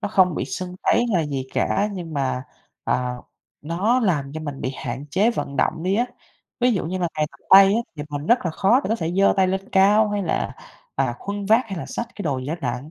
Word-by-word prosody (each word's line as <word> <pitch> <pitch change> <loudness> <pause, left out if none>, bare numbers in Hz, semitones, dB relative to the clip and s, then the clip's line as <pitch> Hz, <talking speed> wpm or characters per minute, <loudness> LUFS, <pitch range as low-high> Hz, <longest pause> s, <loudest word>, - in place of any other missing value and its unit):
Nó - - -2
không 185 -4 +3
bị - - -2
sưng 180 0 -5
tấy - - +3
hay 240 - +2 0.2
là - - -3
gì 135 -2 -3
cả, 205 +1 +1
nhưng 170 -5 -6
mà, 130 -2 -1 0.4
à, 125 0 0 0.5
nó 195 +11 +1
làm 150 - 0
cho 155 - -5
mình 145 -3 -6
bị 130 - -2
hạn 130 +4 -5
chế 205 +5 +3
vận 140 -11 -4
động 160 0 0
đi 185 +2 +1
á. 240 +4 +2 0.5
Ví 245 0 +4
dụ 195 - -1
như 185 +3 -3
là 175 - 0
ngày 155 -1 +1
tập - - -19
tay 195 +1 +10
á 230 - +2 0.2
thì 145 - -4
mình 145 +2 -4
rất 240 +1 +5
là 175 - 0
khó 200 +10 +3
để - - -2
có 225 - +1
thể 165 -2 -3
giơ 195 - +5
tay 190 -1 +3
lên 190 +1 -2
cao 205 +3 +5
hay 205 -1 -1
là, 165 - -2 0.4
à, 120 - 0
khuân 200 0 -5
vác 225 +3 +5
hay 195 -5 -5
là - - -6
xách 235 - -4
cái 205 - -6
đồ 140 -7 -1
gì 130 - -6
đó 155 - -2
nặng. 130 +4 -4
180 Hz, 260 wpm, -23 LUFS, 145-205 Hz, 0.5 s, tay